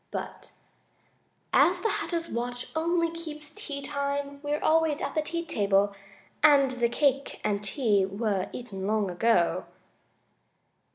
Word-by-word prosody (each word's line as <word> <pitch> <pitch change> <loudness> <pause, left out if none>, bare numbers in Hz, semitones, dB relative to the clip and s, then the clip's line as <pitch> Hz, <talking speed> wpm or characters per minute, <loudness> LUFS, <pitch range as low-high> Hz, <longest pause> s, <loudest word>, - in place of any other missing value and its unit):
"But - - -6 1.0
as - - +4
the 445 - +1
Hatter's 335 -1 -2
watch 245 +4 -4
only 335 +1 +1
keeps 310 -3 -7
tea 290 -9 -5
time 280 0 -2
we're 295 0 -1
always 320 -1 +2
at - - -3
the 310 - +1
tea 335 +2 -3
table, 200 -5 +2 0.5
and 285 -3 +6
the 240 -2 +1
cake 275 +1 +1
and 205 -1 0
tea 205 -3 +2
were 200 -1 -1
eaten 195 -6 -6
long 210 -3 +1
ago." 180 -3 +2
275 Hz, 130 wpm, -28 LUFS, 210-305 Hz, 1.0 s, and